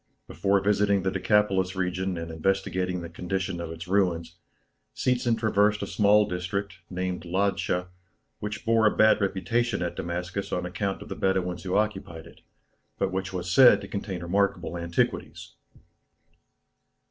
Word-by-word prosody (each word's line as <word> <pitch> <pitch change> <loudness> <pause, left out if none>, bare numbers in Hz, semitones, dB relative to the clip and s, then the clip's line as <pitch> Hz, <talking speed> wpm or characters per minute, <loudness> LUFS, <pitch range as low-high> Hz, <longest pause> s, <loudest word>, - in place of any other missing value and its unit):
Before 100 +5 +1
visiting 100 -1 +2
the 95 - 0
Decapolis 95 -1 +2
region 95 0 -1
and 85 0 -5
investigating 90 +1 -1
the - - -5
condition 90 0 -3
of 85 - -5
its 80 +2 -8
ruins, 85 -4 0 0.6
Seetzen 120 -2 +1
traversed 105 -1 +2
a - - -1
small 105 +2 +4
district, 90 +1 -4
named 90 -1 -3
Ladscha, 90 0 0 0.5
which 105 +2 -5
bore 115 -1 +4
a - - 0
bad 110 0 +5
reputation 100 +2 0
at 85 - -3
Damascus 90 +3 -4
on 90 - -1
account 95 +2 -3
of - - -14
the - - -4
Bedouins 90 -2 0
who 90 +1 -2
occupied 95 -6 -2
it, 85 - -16 0.6
but 95 -1 0
which 95 0 -3
was 90 -1 -4
said 130 +4 +7
to - - -8
contain 95 -3 -5
remarkable 90 -1 0
antiquities. 85 0 -2
95 Hz, 145 wpm, -27 LUFS, 90-100 Hz, 0.6 s, said